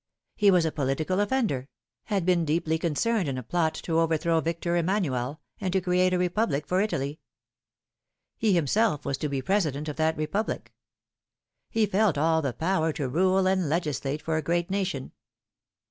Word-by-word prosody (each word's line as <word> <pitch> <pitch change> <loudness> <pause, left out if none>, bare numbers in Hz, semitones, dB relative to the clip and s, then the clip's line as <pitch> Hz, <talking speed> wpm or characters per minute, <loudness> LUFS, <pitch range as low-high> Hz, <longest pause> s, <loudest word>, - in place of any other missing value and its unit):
He 205 - +4
was 180 -3 +4
a 160 - 0
political 150 +6 -1
offender 205 - 0 0.4
had 200 -5 -1
been 180 -2 +3
deeply 160 +1 0
concerned 180 +4 0
in 130 - -3
a 130 - -5
plot 160 +5 0
to 165 -1 +1
overthrow 165 0 +2
Victor 170 +1 -1
Emanuel, 160 -7 -1 0.2
and 190 -3 -2
to 190 - +3
create 180 0 +2
a 180 - +2
Republic 180 -5 0
for 180 +5 +1
Italy. 150 -8 -2 1.2
He 215 -3 +2
himself 170 - +1
was 140 -1 -2
to 150 - -2
be 135 -2 -2
President 155 -7 0
of 150 - -5
that 160 0 +1
Republic. 155 +8 -3 1.0
He 225 -1 +2
felt 200 -4 +2
all 160 +2 +2
the 140 -4 -1
power 165 +2 0
to 140 -3 -2
rule 185 +7 +2
and 185 -4 +1
legislate 150 -3 -2
for 160 -1 0
a - - 0
great 170 +4 -1
nation. 190 -9 -2
165 Hz, 170 wpm, -27 LUFS, 150-190 Hz, 1.2 s, He